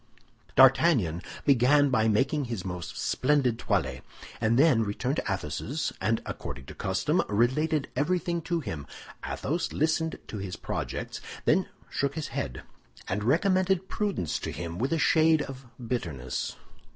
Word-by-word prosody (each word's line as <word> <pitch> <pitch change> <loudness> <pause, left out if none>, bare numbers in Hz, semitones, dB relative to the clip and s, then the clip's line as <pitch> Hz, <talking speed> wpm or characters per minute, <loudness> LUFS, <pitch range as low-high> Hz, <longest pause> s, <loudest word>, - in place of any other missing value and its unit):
D'Artagnan 130 - +5 0.2
began 140 +2 +5
by 110 -3 +3
making 135 +7 +2
his 115 -7 -4
most 90 -2 -5
splendid 130 -4 +1
toilet, - - -1 0.4
then 120 +3 +4
returned 125 +7 -1
to - - -1
Athos's, 100 - -2
and 110 +4 +1
according 65 +1 -6
to - - -9
custom, - - +1
related 140 +7 +2
everything 170 +4 0
to 170 +1 -1
him. 85 - -5 0.4
Athos 165 +4 -2
listened 160 +1 0
to 105 - -6
his 95 -2 -5
projects, - - -4 0.2
then - - +3 0.2
shook 140 0 -1
his 160 - -3
head, 65 -2 -4 0.4
and 100 +2 -1
recommended 185 - +2
prudence 200 - -1
to - - -4
him 85 0 -5
with 130 +6 0
a 165 - +2
shade 160 -1 +4
of 135 -2 -9
bitterness. 85 - -3
130 Hz, 140 wpm, -28 LUFS, 105-160 Hz, 0.4 s, D'Artagnan